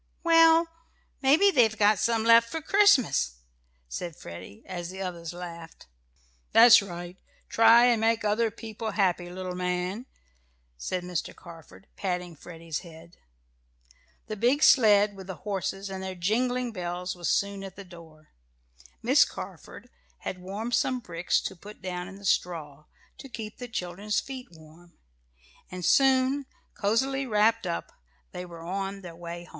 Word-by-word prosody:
"Well, 330 0 +6 0.5
maybe 310 +9 +5
they've 225 - +3
got 205 -1 +4
some 230 -1 +1
left 230 0 +6
for 325 - -3
Christmas," 310 - +3 0.5
said 160 - -6
Freddie, 85 +2 -11
as 175 -2 -6
the 190 +1 -9
others 175 -3 -5
laughed. 170 -2 -10 0.7
"That's 230 0 +9
right 175 -1 -8 0.3
try 230 +1 +6
and 235 -3 +3
make 225 0 +2
other 220 +2 +2
people 220 0 -7
happy, 180 -3 0
little 185 0 -6
man," 180 +6 -3 0.7
said 175 - -4
Mr. 180 -2 -4
Carford, 170 +2 -14
patting 180 -3 -3
Freddie's 165 0 -7
head. 170 -1 -14 1.1
The 215 - -5
big 250 +8 +2
sled 210 -4 +5
with 190 -1 -10
the 190 - -6
horses 195 -1 -3
and 190 -1 -6
their 190 0 -5
jingling 245 +7 0
bells 180 -2 -4
was 175 -1 -3
soon 200 -1 0
at 195 -1 -9
the 200 - -10
door. 160 -3 -15 0.7
Miss - - +6
Carford - - -9 0.3
had 185 - -5
warmed 205 +6 -5
some 255 0 +1
bricks 170 -6 -1
to 190 - -5
put 205 +4 -13
down 180 -1 -5
in 195 - -10
the 200 0 -12
straw, 155 -6 -1 0.3
to 270 - -10
keep 220 -3 -8
the 245 - -6
children's 200 0 -3
feet 260 -2 -8
warm, 165 +1 -18 0.7
and 180 -1 -6
soon, 270 0 +3 0.3
cozily 265 +6 0
wrapped 220 -1 +2
up, 170 - -4 0.4
they 180 - -7
were 170 -1 -11
on 195 +2 -4
their 175 -3 -10
way 170 0 -8
home. 175 - -17
195 Hz, 150 wpm, -27 LUFS, 175-230 Hz, 1.1 s, That's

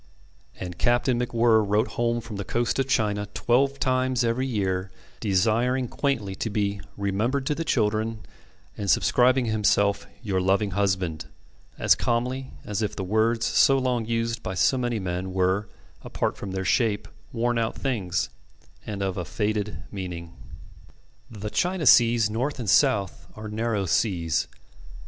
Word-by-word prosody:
And 90 -2 -6
Captain 120 +1 +2
MacWhirr 115 -2 +3
wrote 105 +3 +1
home 120 0 -1
from 110 -3 -8
the 100 - -3
coast 120 +5 -1
of 135 - +1
China 105 -5 0
twelve 125 +8 +2
times 130 -1 +1
every 120 +3 0
year, 95 -5 -1 0.3
desiring 115 +5 +1
quaintly 120 -8 -1
to 115 - -2
be 100 -1 -1 0.2
"remembered 110 +7 -1
to 150 - +1
the 165 - -3
children," 110 -4 0 0.5
and 100 -1 -4
subscribing 125 +4 +3
himself 100 -2 +1 0.2
"your 95 -4 0
loving 100 +2 +1
husband," 95 -5 -1 0.5
as - - +5
calmly 125 +3 -1 0.2
as 105 +1 -2
if 105 - -2
the 95 - -4
words 110 +4 +1
so 135 +3 +4
long 125 -4 0
used 115 0 -1
by 95 - -4
so 130 - +3
many 120 -2 -1
men 90 -1 -3
were, 95 +2 +1 0.3
apart - - -2
from 100 - -7
their 95 0 -3
shape, 110 0 +1 0.2
worn 120 0 0
out 115 -1 -1
things, 100 -10 -1 0.6
and 100 -2 -3
of 95 -1 -2
a 90 - -2
faded 105 -1 -2
meaning. 90 -4 -6 1.0
The 105 -2 -6
China 180 -2 0
seas 115 -3 +6
north 125 +7 -2
and 120 -4 -5
south 100 -5 +2
are 110 0 -7
narrow 105 -2 -1
seas. 85 -4 0
110 Hz, 150 wpm, -25 LUFS, 100-120 Hz, 1.0 s, seas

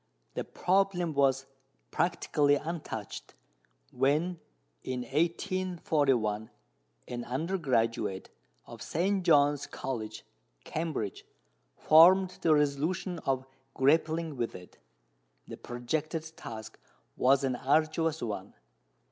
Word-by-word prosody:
The - - -3
problem 185 -3 +1
was 135 -1 +2 0.5
practically 150 -4 +2
untouched 150 - -6 0.6
when, 150 +7 +1 0.4
in 125 -1 -3
1841, 150 - 0 0.6
an 120 -1 -5
undergraduate 125 - -1 0.3
of - - -11
St. 190 +4 0
John's 145 -4 +4
College, 110 -5 -5 0.4
Cambridge, 155 - -3 0.5
formed 180 +4 +6
the 160 -2 +4
resolution 150 +5 0
of 130 -1 0 0.3
grappling 160 +3 +2
with 120 -1 -2
it. 90 -1 -13 0.7
The - - -8
projected 155 +6 -3
task 110 -1 -9 0.4
was 135 +2 +3
an 130 -2 0
arduous 155 +4 +1
one. 100 -4 -5
145 Hz, 90 wpm, -30 LUFS, 125-165 Hz, 0.7 s, formed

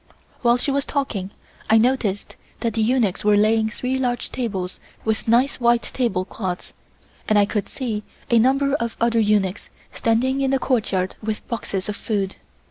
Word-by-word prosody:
While 240 -1 +4
she 275 - -1
was 280 0 +1
talking 230 -11 -2 0.4
I 220 - +6
noticed 225 -4 +1 0.3
that 230 -2 0
the 225 - 0
eunuchs 220 -4 +1
were 210 0 +4
laying 220 +1 +3
three 255 +4 -2
large 245 -2 -1
tables 195 -7 -3 0.3
with 220 0 -1
nice 245 +5 +3
white 240 -1 +3
table 195 -8 -1
cloths, 185 -3 -5 0.6
and 215 - +4
I 205 - +6
could 205 -1 -2
see 225 -5 -3 0.3
a 235 - +6
number 275 +3 +3
of 235 -6 -2
other 230 0 +2
eunuchs 205 -3 +1 0.2
standing 255 +4 +1
in 270 - +2
the 270 - +3
courtyard 210 -8 0
with 215 -1 -4
boxes 200 -5 -3
of 210 - -3
food. 200 -3 -2
225 Hz, 170 wpm, -22 LUFS, 205-250 Hz, 0.6 s, I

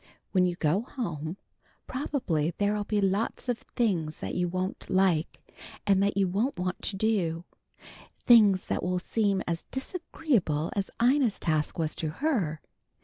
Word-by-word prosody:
When 185 -2 +4
you 175 -1 0
go 175 +3 +1
home, 170 - -5 0.5
probably 175 - -1
there'll 205 0 0
be 210 0 0
lots 200 +6 0
of 245 -2 0
things 175 -10 -1
that - - -5
you 180 0 0
won't 185 +2 -3
like, 185 -4 +1 0.4
and 195 -1 +4
that 200 0 +1
you 195 -1 +3
won't 210 +10 0
want 180 +1 -2
to 200 - -1
do. 185 -6 0 0.8
Things 210 -6 +6
that - - -1
will 180 0 0
seem 200 +1 0
as 165 -1 -1
disagreeable 265 - -1
as 195 -1 -1
Ina's 245 -2 +3
task 155 -2 0
was 160 -2 0
to 160 - -3
her. 175 - -1
195 Hz, 150 wpm, -28 LUFS, 170-225 Hz, 0.8 s, Things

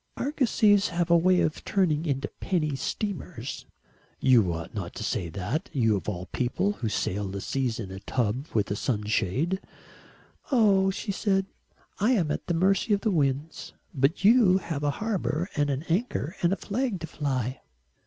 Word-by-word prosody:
"Argosies 220 -8 +3
have 175 -1 -1
a - - +7
way 180 +2 +4
of 155 - -1
turning 170 -5 +1
into 140 -1 -1
penny 155 -6 0
steamers." 175 - -4 0.5
"You 120 -9 +4
ought 80 -1 -5
not - - -5
to - - -5
say 85 - -2
that 100 - -3
you 115 -6 +3
of 95 -2 -3
all 90 -3 -4
people, 150 +11 0
who 120 - -3
sail 100 -1 -1
the 100 +1 -5
seas 125 +1 -2
in 100 -4 -5
a 95 - -7
tub 125 +6 -1
with 105 -3 0
a - - 0
sunshade." 110 - 0 0.9
"Oh," 200 -6 +4
she 200 +2 -3
said, 195 -1 +1 0.5
"I 220 +6 +3
am 170 -10 +1
at - - -4
the 175 - 0
mercy 195 +5 +2
of 200 - -5
the 220 - +1
winds. 145 -1 -1 0.2
But 140 +6 +1
you 215 -4 +6
have 165 -5 -4
a 145 - +2 0.2
harbour 185 -5 -1
and 145 -2 +1
an 140 +1 -1
anchor 175 - -1
and 175 - +3
a - - +2
flag 220 -2 -2
to - - -3
fly." 130 -5 -2
155 Hz, 175 wpm, -27 LUFS, 125-195 Hz, 0.9 s, a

